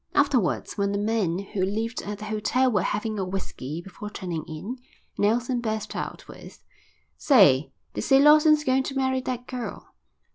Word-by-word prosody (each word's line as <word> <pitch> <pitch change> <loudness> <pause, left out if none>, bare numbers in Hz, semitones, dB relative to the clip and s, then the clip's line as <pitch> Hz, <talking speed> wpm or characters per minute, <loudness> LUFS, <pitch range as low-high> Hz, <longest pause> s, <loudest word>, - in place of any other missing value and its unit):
Afterwards, 260 -8 +1
when 200 0 +1
the - - 0
men 205 -5 0
who 195 0 -3
lived 225 +5 -2
at 205 0 -5
the 210 - -8
hotel 220 +5 +1
were 205 -5 +2
having 210 +2 -2
a - - 0
whisky 175 -4 -5
before 195 +3 -8
turning 175 -6 -5
in, 185 +11 -6 0.4
Nelson 240 +4 +1
burst 220 -2 -3
out - - -5
with: - - -13 0.5
"Say, 185 - +5 0.2
they - - -3
say 270 - +4
Lawson's 305 +1 +6
going 265 -1 +2
to 270 +1 -5
marry 260 -1 +1
that 250 -1 -4
girl." 250 -2 -7
215 Hz, 170 wpm, -25 LUFS, 195-255 Hz, 0.5 s, Lawson's